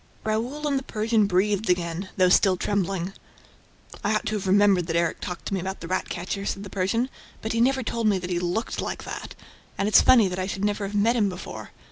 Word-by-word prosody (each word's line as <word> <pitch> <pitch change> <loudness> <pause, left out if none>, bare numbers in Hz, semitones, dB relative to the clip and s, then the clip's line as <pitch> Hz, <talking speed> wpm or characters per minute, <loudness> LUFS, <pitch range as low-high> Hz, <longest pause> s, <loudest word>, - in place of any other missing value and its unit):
Raoul 240 +8 -2
and 280 -2 +1
the - - -10
Persian 215 -2 +1
breathed 200 +2 +1
again, 180 +1 -1
though 185 -1 +5
still 185 0 +4
trembling. 195 -1 -1 0.9
"I 210 +2 +1
ought 215 - -1
to 215 - -1
have 195 - -5
remembered 195 -3 +4
that 165 - -2
Erik 170 -1 0
talked 180 -1 -6
to - - -3
me 190 - 0
about 190 +2 -4
the 165 - -7
rat 185 - -2
catcher," 185 +3 -4
said 200 0 -3
the 200 - -9
Persian. 205 +6 0 0.4
"But 220 - -2
he 230 - +1
never 265 +1 +2
told 230 0 -1
me 205 -2 +3
that 180 0 -5
he 175 - 0
looked 180 +6 -2
like - - -4
that... - - -7 0.4
and 200 - 0
it's 215 - +7
funny 235 -6 +6
that 180 0 -4
I 185 - -1
should 195 +1 -2
never 205 -1 -1
have 205 - -6
met 220 +4 +3
him 210 -4 +2
before 180 0 -8
200 Hz, 235 wpm, -25 LUFS, 185-220 Hz, 0.9 s, it's